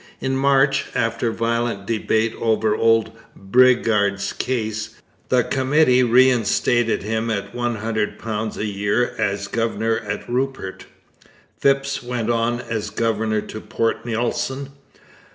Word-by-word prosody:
In 130 0 -1
March, 135 0 +3
after 115 0 0
violent 115 -2 -1
debate 110 0 0
over 110 -1 +2
old 115 0 +3 0.3
Bridgar's 105 -3 +2
case, 110 -4 -3 0.3
the 125 -1 +3
Committee 130 0 +3
reinstated 120 -2 +3
him 110 +2 -2
at 100 -2 -3
£100 110 -2 -2
a 105 - -2
year 105 +4 0
as 100 0 -1
governor 115 0 -1
at 100 -1 -5
Rupert. 125 -6 -3 0.7
Phipps 135 0 +1
went 120 -2 -2
as 115 -1 -1
governor 110 -1 0
to 110 - -8
Port 115 +1 -1
Nelson. 120 +4 -2
115 Hz, 110 wpm, -21 LUFS, 110-125 Hz, 0.7 s, March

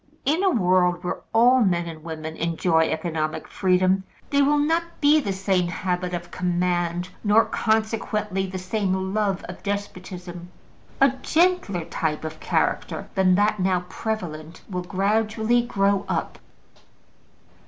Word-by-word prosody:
In 310 +7 +2
a 385 - +4
world 180 - +2
where 180 - -3
all 245 +3 +5
men 175 -5 +2
and 160 -2 -8
women 160 -1 -6
enjoy 165 0 +1
economic 160 -1 -2
freedom, 185 0 +2 0.3
there 280 0 +4
will 295 +1 +3
not 330 +3 0
be 300 0 +5
the 205 -9 -2
same 190 -2 0
habit 180 +1 -2
of 175 0 -7
command, 175 0 -1
nor, 220 +2 +5
consequently, 215 -3 -1
the 185 0 -5
same 190 0 -1
love 205 -3 0
of - - -9
despotism; 185 -3 -6 0.5
a 275 - +6
gentler 325 - +1
type 155 -2 -2
of 155 0 -6
character - - -1
than 190 -2 +4
that 210 +1 +2
now 185 -1 +1
prevalent 170 -8 -5
will 180 -3 -3
gradually 215 +5 +1
grow 200 -4 +1
up. - - -2
190 Hz, 135 wpm, -24 LUFS, 175-220 Hz, 0.5 s, a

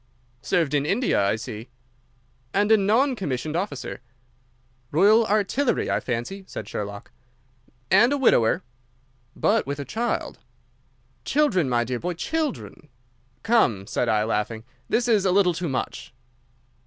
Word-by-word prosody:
"Served 165 -5 0
in 145 -1 +2
India, 195 - +1
I 100 - +2
see." 110 +1 -8 0.9
"And 205 +2 +2
a 220 - +7
non 230 +7 +2
commissioned 150 - -3
officer." 190 +4 -4 0.9
"Royal 210 - +4
Artillery, 215 +6 +1
I - - +1
fancy," 125 +11 -4
said 105 - -7
Sherlock. 100 0 -6 0.8
"And 220 +7 +6
a 285 - +1
widower." 120 - +3 0.7
"But - - +1
with 140 +1 -4
a 140 - -4
child." 230 - -3 0.8
"Children, 210 - +1
my 120 -1 +2
dear 125 +1 -3
boy, 180 +4 -3
children." 300 - -4 0.5
"Come," 165 - +2
said 120 +2 -1
I, 105 -1 +2
laughing, 110 0 -2 0.3
"this 240 +1 +1
is 215 -5 +3
a 190 - +2
little 185 -2 +3
too 170 0 -3
much." 130 -1 -4
175 Hz, 135 wpm, -24 LUFS, -, 0.9 s, a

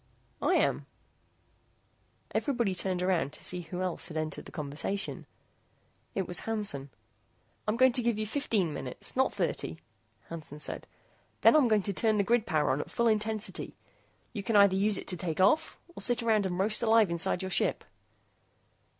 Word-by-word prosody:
"I - - +2
am." - - +1 1.5
Everybody 240 -8 0
turned 185 0 -1
around 170 -7 +1
to - - -9
see 180 0 -2
who 180 +2 -5
else 180 -2 -2
had 160 - -6
entered 155 0 -3
the - - -11
conversation. 150 +7 -3 0.9
It 190 -2 -1
was 175 - 0
Hansen. 205 -12 -3 0.8
"I'm 215 +2 +1
going 260 +1 +6
to 250 +1 0
give 235 -2 0
you 215 - -2
fifteen 215 - -1
minutes, - - -4
not - - +2
thirty," 80 - -2 0.5
Hansen 155 -3 -7
said. - - -6 0.5
"Then - - +7
I'm 295 -5 +5
going 215 -3 +3
to 200 - -2
turn 220 +2 +2
the 200 - +3
grid 230 +1 +1
power 150 -3 +2
on 135 +3 0
at - - -8
full 235 - +1
intensity. 215 -1 -1 0.6
You 210 - -3
can 225 +2 -1
either 200 -2 +6
use 200 +1 +3
it - - -6
to 180 - -1
take 165 -1 -3
off, 200 +11 +3 0.2
or - - -2
sit 245 -1 +5
around 215 -4 +2
and 180 -1 -3
roast 210 +3 +1
alive 225 -4 +4
inside 170 +2 0
your 190 - -4
ship." - - +1
200 Hz, 175 wpm, -30 LUFS, 170-220 Hz, 1.5 s, Then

